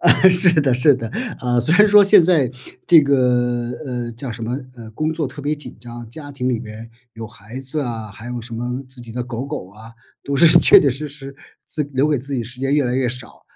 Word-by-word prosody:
啊， 190 Hz, -, +4 dB
是 180 Hz, -2 st, +4 dB
的 135 Hz, -, +1 dB
是 130 Hz, +3 st, +4 dB
的， 115 Hz, -3 st, -6 dB, 0.3 s
啊， 120 Hz, -1 st, 0 dB
虽 155 Hz, +8 st, +2 dB
然 210 Hz, -, +6 dB
说 205 Hz, 0 st, +6 dB
现 200 Hz, -3 st, +6 dB
在 155 Hz, -9 st, +2 dB, 0.4 s
这 165 Hz, -3 st, +7 dB
个， 125 Hz, -3 st, +1 dB
呃， 125 Hz, -3 st, -5 dB
叫 120 Hz, +2 st, -7 dB
什 115 Hz, 0 st, -9 dB
么， 120 Hz, +4 st, -3 dB, 0.2 s
呃， 115 Hz, -2 st, -11 dB
工 155 Hz, +6 st, -2 dB
作 155 Hz, -2 st, -3 dB
特 135 Hz, +2 st, -10 dB
别 150 Hz, +1 st, -1 dB
紧 150 Hz, -, -10 dB
张， 120 Hz, 0 st, -10 dB
家 145 Hz, +4 st, -9 dB
庭 130 Hz, -2 st, -3 dB
里 120 Hz, -, -1 dB
边 110 Hz, 0 st, -10 dB, 0.2 s
有 115 Hz, 0 st, -8 dB
孩 110 Hz, +3 st, -11 dB
子 135 Hz, +3 st, -1 dB
啊， 115 Hz, -5 st, -5 dB
还 105 Hz, +3 st, -12 dB
有 125 Hz, -1 st, -5 dB
什 115 Hz, 0 st, -9 dB
么 125 Hz, +3 st, -4 dB
自 130 Hz, -2 st, -9 dB
己 115 Hz, -, -11 dB
的 125 Hz, +1 st, -4 dB
狗 120 Hz, 0 st, -6 dB
狗 140 Hz, -9 st, -7 dB
啊， 110 Hz, +3 st, -14 dB, 0.3 s
都 140 Hz, -, -3 dB
是 170 Hz, -, +5 dB
确 -, -, +7 dB
确 140 Hz, -, +2 dB
实 140 Hz, +4 st, -3 dB
实 140 Hz, -1 st, -10 dB, 0.3 s
自 155 Hz, -, -1 dB
留 135 Hz, +3 st, +1 dB
给 150 Hz, -, +1 dB
自 135 Hz, +3 st, -4 dB
己 130 Hz, -, -1 dB
的 -, -, -5 dB
时 125 Hz, +2 st, -10 dB
间 135 Hz, +1 st, 0 dB
越 150 Hz, -, +2 dB
来 125 Hz, -1 st, -2 dB
越 130 Hz, -1 st, 0 dB
少， 125 Hz, -1 st, -7 dB
125 Hz, 265 characters per minute, -19 LUFS, 120-145 Hz, 0.4 s, 这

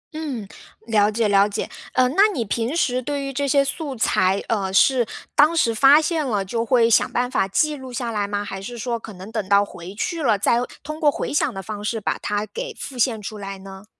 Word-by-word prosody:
嗯， 275 Hz, -10 st, -4 dB, 0.4 s
了 210 Hz, -2 st, +3 dB
解 220 Hz, 0 st, +1 dB
了 200 Hz, 0 st, +4 dB
解。 205 Hz, -, -3 dB, 0.3 s
呃， 255 Hz, -1 st, +4 dB
那 390 Hz, +9 st, +5 dB
你 235 Hz, -7 st, -2 dB
平 230 Hz, +7 st, -2 dB
时 255 Hz, -6 st, +1 dB
对 285 Hz, +2 st, -3 dB
于 275 Hz, 0 st, -4 dB
这 280 Hz, +2 st, -1 dB
些 275 Hz, +1 st, +3 dB
素 285 Hz, -1 st, -4 dB
材， 190 Hz, -3 st, +1 dB
呃， 195 Hz, -4 st, -1 dB
是 245 Hz, +4 st, +4 dB, 0.3 s
当 310 Hz, +3 st, +5 dB
时 230 Hz, -6 st, +3 dB
发 275 Hz, +6 st, +7 dB
现 320 Hz, -1 st, 0 dB
了 205 Hz, -6 st, -1 dB
就 230 Hz, +4 st, -2 dB
会 235 Hz, -1 st, +3 dB
想 220 Hz, -, +3 dB
办 245 Hz, 0 st, 0 dB
法 225 Hz, -7 st, +1 dB
记 300 Hz, +10 st, +1 dB
录 260 Hz, -2 st, -9 dB
下 240 Hz, -1 st, -3 dB
来 205 Hz, -2 st, -1 dB
吗？ 205 Hz, 0 st, -3 dB
还 195 Hz, -1 st, -6 dB
是 240 Hz, +4 st, -7 dB
说 235 Hz, 0 st, -3 dB
可 220 Hz, -1 st, -10 dB
能 190 Hz, +4 st, -10 dB
等 210 Hz, -4 st, -3 dB
到 200 Hz, 0 st, +5 dB
回 180 Hz, +1 st, -10 dB
去 330 Hz, -, -3 dB
了， 220 Hz, -7 st, +3 dB
再 235 Hz, +4 st, +2 dB, 0.3 s
通 305 Hz, +2 st, -6 dB
过 300 Hz, -3 st, +4 dB
回 -, -, -4 dB
想 290 Hz, -2 st, +1 dB
的 195 Hz, -, -5 dB
方 210 Hz, +1 st, -6 dB
式 225 Hz, +1 st, -2 dB
把 -, -, -2 dB
它 210 Hz, +1 st, -2 dB
给 -, -, -6 dB
复 265 Hz, -, -7 dB
现 230 Hz, -2 st, +1 dB
出 210 Hz, +1 st, -6 dB
来 195 Hz, -1 st, -6 dB
呢？ 190 Hz, +1 st, -11 dB
230 Hz, 255 characters per minute, -22 LUFS, 205-275 Hz, 0.4 s, 发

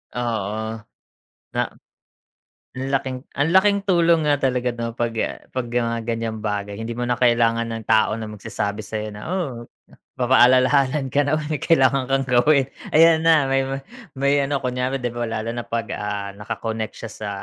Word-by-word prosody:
Oo, 110 Hz, -2 st, -3 dB, 0.7 s
na -, -, +2 dB, 1.2 s
ang 130 Hz, +1 st, -3 dB
laking 130 Hz, -1 st, -1 dB, 0.2 s
ang 145 Hz, +3 st, +1 dB
laking 200 Hz, +3 st, +4 dB
tulong 170 Hz, -5 st, +3 dB
nga 145 Hz, -, +3 dB
talaga 125 Hz, -2 st, 0 dB
'no 115 Hz, -1 st, -4 dB
pag 120 Hz, 0 st, -1 dB, 0.2 s
ah, -, -, -7 dB
pag 130 Hz, -1 st, -3 dB
mga 115 Hz, -1 st, -1 dB
ganyang 115 Hz, -1 st, -2 dB
bagay. 105 Hz, -1 st, -3 dB
Hindi 115 Hz, +2 st, -4 dB
mo 120 Hz, -, -5 dB
na 120 Hz, -, +1 dB
kailangan 115 Hz, -1 st, +3 dB
ng 115 Hz, -1 st, -5 dB
tao 110 Hz, -1 st, +4 dB
na 110 Hz, -1 st, -5 dB
magsasabi 105 Hz, 0 st, -4 dB
sayo 110 Hz, 0 st, -4 dB
na, 105 Hz, 0 st, -9 dB
oh, 150 Hz, -10 st, -3 dB, 0.5 s
papaalalahanan 130 Hz, +2 st, +4 dB
ka 145 Hz, -, +4 dB
na 145 Hz, +2 st, +1 dB
may 150 Hz, 0 st, -3 dB
kailangan 135 Hz, -4 st, +3 dB
kang 135 Hz, 0 st, +1 dB
gawin, 135 Hz, +3 st, +4 dB, 0.2 s
ayan 160 Hz, 0 st, +5 dB
na, 160 Hz, -3 st, +4 dB
may 135 Hz, 0 st, +2 dB, 0.6 s
may 140 Hz, +1 st, +3 dB
ano 140 Hz, +1 st, 0 dB
kunyare 125 Hz, +1 st, -1 dB
'di 120 Hz, -2 st, -3 dB
ba, 120 Hz, -1 st, -3 dB
lalo 115 Hz, +1 st, -3 dB
na 120 Hz, -, -3 dB
pag 115 Hz, -1 st, -3 dB
ah, 100 Hz, -1 st, -4 dB
naka-connect 110 Hz, +2 st, -5 dB
siya 115 Hz, -, -7 dB
sa 110 Hz, -, -6 dB
120 Hz, 170 wpm, -22 LUFS, 115-140 Hz, 1.2 s, ayan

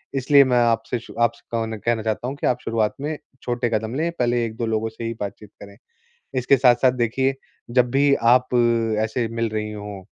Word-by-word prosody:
इसलिए 140 Hz, +1 st, +5 dB
मैं 125 Hz, -2 st, +1 dB
आपसे 115 Hz, +1 st, 0 dB, 0.2 s
आपसे 115 Hz, 0 st, +1 dB
कहना 115 Hz, -1 st, -2 dB
कहना 115 Hz, +1 st, -1 dB
चाहता 110 Hz, +2 st, -2 dB
हूँ 135 Hz, -, -4 dB
कि -, -, +1 dB
आप 125 Hz, 0 st, +1 dB
शुरुआत 110 Hz, -2 st, 0 dB
में 150 Hz, +1 st, -3 dB, 0.3 s
छोटे 120 Hz, 0 st, -1 dB
कदम 110 Hz, +2 st, -2 dB
लें 165 Hz, +4 st, 0 dB
पहले 120 Hz, -1 st, +1 dB
1-2 115 Hz, +1 st, -4 dB
लोगों 110 Hz, 0 st, -1 dB
से 110 Hz, +1 st, -10 dB
ही 115 Hz, 0 st, -2 dB
बातचीत 100 Hz, 0 st, -7 dB
करें। 100 Hz, 0 st, -13 dB, 0.6 s
इसके 130 Hz, +2 st, +3 dB
साथ-साथ 125 Hz, 0 st, +4 dB
देखिए, 130 Hz, +2 st, 0 dB, 0.4 s
जब 125 Hz, 0 st, +2 dB
भी 140 Hz, +2 st, +4 dB, 0.2 s
आप 125 Hz, 0 st, +1 dB, 0.6 s
ऐसे 115 Hz, +1 st, -2 dB
मिल 115 Hz, 0 st, -2 dB
रही 105 Hz, 0 st, -3 dB
हों 105 Hz, -2 st, -8 dB
115 Hz, 190 wpm, -22 LUFS, 110-125 Hz, 0.6 s, इसलिए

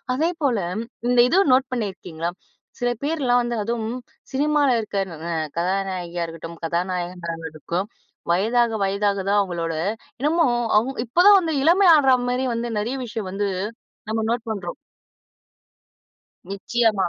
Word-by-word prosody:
அதேபோல 305 Hz, -6 st, 0 dB, 0.5 s
இந்த 245 Hz, -, +2 dB
இதுவும் 360 Hz, -2 st, +4 dB
நோட் 260 Hz, 0 st, +3 dB
பண்ணியிருக்கீங்களா? 180 Hz, -7 st, -3 dB, 0.5 s
சில 245 Hz, -, +2 dB
பேர்லாம் 275 Hz, -5 st, +2 dB
வந்து 240 Hz, -1 st, -2 dB
அதுவும் 230 Hz, +2 st, -2 dB, 0.4 s
சினிமால 295 Hz, +1 st, +2 dB
இருக்க 205 Hz, -3 st, -2 dB
ந -, -, -7 dB
ந -, -, -3 dB, 0.3 s
கதாநாயகியா 180 Hz, -1 st, -1 dB
இருக்கட்டும், 165 Hz, 0 st, -9 dB
கதாநாயகனா 175 Hz, 0 st, -2 dB, 0.2 s
இருக்கட்டும் 170 Hz, +5 st, -3 dB, 0.5 s
வயதாக 230 Hz, +6 st, +2 dB
வயதாக 200 Hz, +1 st, 0 dB
தான் 205 Hz, +1 st, +4 dB
அவங்களோட 170 Hz, -4 st, -2 dB, 0.5 s
என்னமோ 320 Hz, +5 st, +2 dB, 0.3 s
அவங்க 255 Hz, +5 st, +1 dB
இப்ப 245 Hz, +9 st, -1 dB
தான் 410 Hz, -1 st, +9 dB
வந்து 330 Hz, -3 st, -2 dB
இளமை 360 Hz, +5 st, +5 dB
ஆடுற 270 Hz, -4 st, +5 dB
மாரி 250 Hz, +1 st, 0 dB
வந்து 235 Hz, +1 st, -2 dB
நெறைய 235 Hz, +6 st, -2 dB
விஷயம் 220 Hz, -4 st, -5 dB
வந்து 200 Hz, 0 st, -1 dB, 0.6 s
நம்ம 220 Hz, 0 st, 0 dB
நோட் 235 Hz, 0 st, -2 dB
பண்றோம். 190 Hz, -5 st, -4 dB, 1.7 s
நிச்சயமா. 200 Hz, 0 st, +1 dB
220 Hz, 130 wpm, -23 LUFS, 185-260 Hz, 1.7 s, தான்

